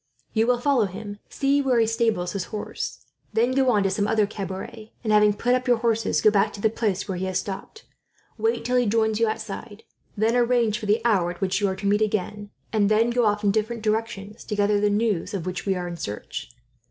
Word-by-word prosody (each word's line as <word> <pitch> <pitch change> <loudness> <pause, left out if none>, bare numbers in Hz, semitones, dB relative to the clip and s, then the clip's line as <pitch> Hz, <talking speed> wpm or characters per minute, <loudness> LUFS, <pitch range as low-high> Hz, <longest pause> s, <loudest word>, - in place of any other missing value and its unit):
You 225 +1 +2
will 250 0 +3
follow 250 -3 +2
him, 205 +2 -7
see 280 +1 +1
where 260 -4 +2
he 225 - +4
stables 225 -6 0
his 195 -3 -3
horse, 210 -2 -6 0.3
then 230 +3 +2
go 260 0 +2
on 210 -4 +3
to 195 - +1
some 205 +1 0
other 215 -1 +3
cabaret 205 +2 -7
and, 215 -2 +1
having 210 0 +6
put 240 +4 0
up 255 +1 0
your 245 -1 +4
horses, 225 -1 +1
go 215 - +5
back 205 +1 +2
to - - -8
the 220 +1 +2
place 205 -5 -1
where 185 -2 -3
he 190 - -2
has 185 -1 -1
stopped, 200 - -6 0.5
wait 230 +1 -1
till 250 +1 +2
he 245 -2 +2
joins 220 0 +1
you 230 - +3
outside, 215 0 -5 0.3
then 220 +3 +2
arrange 240 -3 +2
for 215 - -6
the 215 +3 +1
hour 195 -7 +3
at 175 - -7
which 190 +1 0
you 200 - +3
are 190 - -1
to 195 +1 -7
meet 205 +1 +2
again, 210 -1 -2 0.2
and 205 -2 +3
then 225 +2 +3
go 240 -1 +2
off 210 0 0
in 200 - +4
different 220 +2 -2
directions 215 -2 -2
to 210 - -3
gather 205 0 +2
the 210 - +3
news 205 -3 0
of 180 -4 -4
which 185 +2 -4
we 195 - +2
are 180 -1 -3
in 170 -1 -6
search. 105 -9 -6
215 Hz, 240 wpm, -24 LUFS, 200-230 Hz, 0.5 s, having